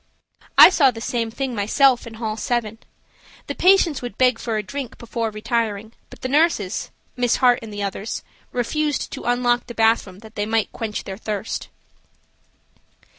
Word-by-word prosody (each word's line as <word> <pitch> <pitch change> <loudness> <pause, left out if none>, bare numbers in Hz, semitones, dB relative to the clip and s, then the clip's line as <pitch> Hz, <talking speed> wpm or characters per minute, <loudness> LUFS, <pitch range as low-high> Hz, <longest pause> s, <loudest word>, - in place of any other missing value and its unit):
I - - +11
saw 285 -7 +5
the 230 -3 -6
same 230 0 -2
thing 260 +2 -3
myself 240 +4 +3
in 225 - -9
hall 220 -1 -3
7. 225 -1 -2 0.7
The - - -4
patients 365 -6 +4
would 245 -5 -7
beg 250 -2 +3
for 225 -2 -2
a 210 - -2
drink 270 +4 -6
before 230 -1 -3
retiring, 215 -1 -2 0.2
but - - -14
the - - -2
nurses–Miss 250 - 0
Hart 245 -1 +4
and 225 -2 -9
the 205 0 -4
others–refused 245 +8 -3
to - - -7
unlock 245 0 +1
the 240 - -8
bathroom 225 -4 +2
that 220 - -13
they 205 -1 -2
might 225 -1 0
quench 220 -3 -4
their 190 -1 -7
thirst. 215 -1 -4
230 Hz, 160 wpm, -22 LUFS, 215-250 Hz, 0.7 s, I